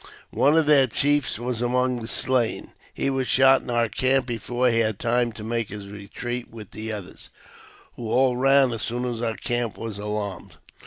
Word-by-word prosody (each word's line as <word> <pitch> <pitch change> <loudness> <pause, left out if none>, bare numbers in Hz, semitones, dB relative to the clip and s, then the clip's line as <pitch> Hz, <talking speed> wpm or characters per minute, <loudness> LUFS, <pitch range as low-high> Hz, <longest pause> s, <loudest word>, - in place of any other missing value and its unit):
One 145 +3 +3
of 160 - +4
their 145 -3 +5
chiefs 145 +2 +1
was 120 0 -3
among 125 0 0
the 110 - -6
slain. 125 -1 0 0.2
He 135 - -1
was 135 -1 -1
shot 135 0 +5
in - - -11
our 120 -1 +1
camp 130 +4 +1
before 120 +1 -1
he 115 - +2
had 110 -3 0
time 120 +1 0
to 105 - -9
make 115 0 -2
his 100 0 -8
retreat 120 +4 -6
with 110 -3 -11
the 110 +1 -6
others, 105 -4 -8 0.7
who 115 -2 -6
all 130 +1 +3
ran 135 0 +4
as 115 -2 -4
soon 120 +2 -2
as 120 -2 -3
our 115 -2 -2
camp 120 -2 -2
was 110 -2 -6
alarmed. 105 -3 -5
120 Hz, 195 wpm, -24 LUFS, 110-130 Hz, 0.7 s, their